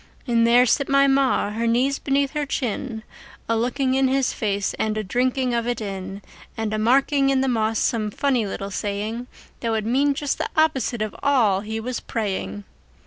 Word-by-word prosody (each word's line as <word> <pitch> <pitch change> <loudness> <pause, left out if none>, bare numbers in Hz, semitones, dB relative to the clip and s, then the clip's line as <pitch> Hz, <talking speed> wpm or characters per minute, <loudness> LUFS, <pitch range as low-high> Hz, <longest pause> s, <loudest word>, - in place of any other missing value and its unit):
And 230 -2 +3
there 245 +2 +6
sit 275 +3 +1
my 275 0 +5
Ma, 270 -6 +2
her 230 +2 -1
knees 255 +5 +1
beneath 275 0 0
her 295 -2 -2
chin, 235 -3 -3 0.4
A 230 - +1
looking 255 +3 0
in 265 0 +3
his 265 0 +1
face 200 -2 -1
and 215 0 0
a 215 - -1
drinking 250 +5 0
of 235 0 -1
it 245 -1 -1
in, 195 -1 -6 0.3
And 220 -1 -2
a 215 - -1
marking 275 +4 +3
in 270 -1 +2
the 270 - +1
moss 225 -3 +1
some 220 -3 0
funny 250 -1 0
little 195 +1 -5
saying 210 +5 -3 0.3
That 230 - -2
would 220 -1 -1
mean 275 +5 +2
just 285 0 -2
the - - -2
opposite 265 -7 +1
of 215 - -5
all 240 -9 +3
he 220 +1 -4
was 245 +2 -4
praying! 145 - -3
235 Hz, 195 wpm, -23 LUFS, 215-270 Hz, 0.4 s, there